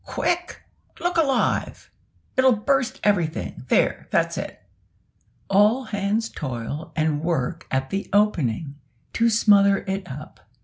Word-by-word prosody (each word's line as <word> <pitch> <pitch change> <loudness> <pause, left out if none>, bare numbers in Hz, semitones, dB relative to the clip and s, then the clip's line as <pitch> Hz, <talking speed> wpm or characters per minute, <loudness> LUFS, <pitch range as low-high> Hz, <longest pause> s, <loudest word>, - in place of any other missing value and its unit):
quick, 350 0 -2 0.4
look 350 +1 -1
alive! 295 -6 0 0.4
it'll 260 -2 +5
burst 255 +3 0
everything 175 -10 0
there, - - +1
that's - - +1
it!" - - -6 0.9
All 210 +6 +4
hands 210 0 -1
toil 135 - -5
and 155 -1 0
work 165 0 -2
at 135 0 -2
the 195 +1 -3
opening, 155 - +1 0.4
to 230 0 +3
smother 200 -3 +4
it 190 -2 -3
up. 150 +4 -9
200 Hz, 120 wpm, -23 LUFS, 155-230 Hz, 0.9 s, it'll